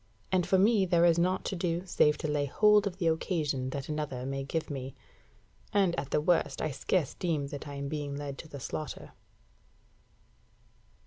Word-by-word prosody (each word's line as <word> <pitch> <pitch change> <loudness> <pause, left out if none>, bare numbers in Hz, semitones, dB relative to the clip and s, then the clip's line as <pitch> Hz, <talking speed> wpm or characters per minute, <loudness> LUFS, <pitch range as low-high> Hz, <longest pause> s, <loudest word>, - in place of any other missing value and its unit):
and 185 -2 +2
for 190 - +4
me 205 +1 +4
there 175 -2 +4
is 170 -1 +4
nought 185 +2 +1
to - - -2
do 175 0 -1
save 150 -4 +3
to - - -3
lay 150 -1 0
hold 210 +6 +4
of 185 -2 -5
the 180 - -2
occasion 155 -5 0
that 140 +1 -5
another 150 -5 -3
may 135 0 -3
give 160 +4 -2
me. 135 -2 -6 0.8
And 195 -4 +3
at 140 - -5
the - - +2
worst 150 -3 +1
I 155 - -1
scarce 155 +2 0
deem 160 -5 -1
that 145 +1 -7
I 145 - -6
am 140 0 -4
being 145 -1 -3
led 140 -1 -5
to - - -8
the 145 -2 -8
slaughter. 150 +3 -6
155 Hz, 190 wpm, -30 LUFS, 140-180 Hz, 0.8 s, for